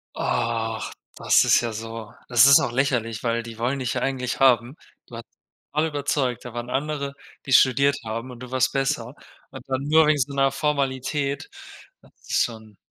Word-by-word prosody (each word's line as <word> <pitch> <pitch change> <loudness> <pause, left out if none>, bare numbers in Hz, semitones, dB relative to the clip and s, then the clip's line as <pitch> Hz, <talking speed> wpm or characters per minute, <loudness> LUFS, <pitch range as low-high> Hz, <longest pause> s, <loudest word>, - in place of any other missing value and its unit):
Ach, 115 -2 -2 0.2
das - - +4
ist - - +5
ja 120 -1 -3
so 115 0 -7 0.2
Das 120 0 +6
ist 140 0 +8
doch - - -1
lächerlich, 120 -4 -1
weil 115 -1 0
die 115 -1 -10
wollen 125 +4 -1
dich 125 -2 -2
ja - - -2
eigentlich 130 -2 -2
haben. 125 0 +4 0.3
Du - - -11
hast - - -8 0.5
alle 155 +2 +1
überzeugt, 140 -4 -2
da 125 -1 -9
waren 120 0 -5
andere, 140 +1 -2 0.3
die 135 - -1
studiert 140 +2 +4
haben, 115 +3 -5
und 125 -1 -11
du 125 -1 -9
warst 130 0 +1
besser. 135 -2 -1 0.4
Und 130 -2 -10
dann 130 0 -2
nur 160 0 +5
wegen 155 -1 +3
so 140 +1 -1
einer 135 0 +2
Formalität, 140 0 -2 0.5
das - - -22 0.2
ist - - +2
schon 110 -3 -8
130 Hz, 185 wpm, -24 LUFS, 115-140 Hz, 0.5 s, ist